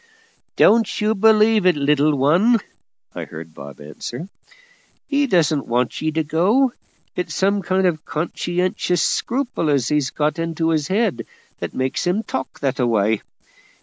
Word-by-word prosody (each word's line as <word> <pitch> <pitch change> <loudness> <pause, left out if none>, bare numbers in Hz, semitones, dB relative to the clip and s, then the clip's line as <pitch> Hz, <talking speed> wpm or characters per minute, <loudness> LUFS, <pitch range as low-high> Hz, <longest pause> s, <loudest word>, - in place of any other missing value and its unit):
"Don't 225 -1 +3
you 215 +1 +2
believe 215 -1 +4
it, 180 - +4
little 145 +1 +2
one," 175 - +4 0.6
I - - -5
heard 80 0 -10
Bob 70 -2 -11
answer. 120 - -7 0.8
"He 285 0 +1
don't 160 - +1
want 120 0 -1
ye 155 - 0
to 160 0 0
go; 205 - +2 0.4
it's 180 - -3
some 200 +1 +1
kind 190 +1 0
of 160 -3 0
conscientious 175 +2 -1
scruple 245 - -1
as 140 -4 +1
he's 150 -3 +1
got 150 +3 -1
into 165 0 -1
his 155 -3 0
head 190 - 0 0.3
that - - -5
makes 130 +6 -1
him 195 +5 0
talk 260 - -5
that 135 0 -1
a 125 - +2
way. 110 -1 +1
165 Hz, 150 wpm, -20 LUFS, 140-200 Hz, 0.8 s, believe